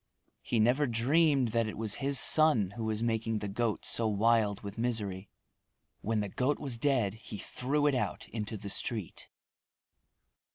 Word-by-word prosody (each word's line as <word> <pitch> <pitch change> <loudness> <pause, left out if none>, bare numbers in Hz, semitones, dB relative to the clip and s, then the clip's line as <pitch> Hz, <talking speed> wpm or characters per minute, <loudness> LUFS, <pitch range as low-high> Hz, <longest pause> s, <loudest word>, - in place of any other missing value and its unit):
He 115 - -1
never 125 +6 +2
dreamed 135 +3 +2
that 115 0 0
it 110 - -6
was 110 -1 -3
his 135 -1 +4
son 150 -13 +5
who 110 +2 -6
was 110 0 -2
making 115 -1 -1
the 105 -1 -4
goat 110 +2 -2
so 115 - +2
wild 110 -1 +1
with 100 +2 -8
misery. 105 -5 -3 0.7
When 110 0 -1
the 105 - -3
goat 130 +8 -1
was 130 -6 -4
dead 125 -8 +1
he 110 -1 -9
threw 140 +8 -2
it 145 - +3
out 125 - -3
into 110 0 -5
the 100 0 -7
street. 110 -6 -4
115 Hz, 165 wpm, -30 LUFS, 105-125 Hz, 0.7 s, son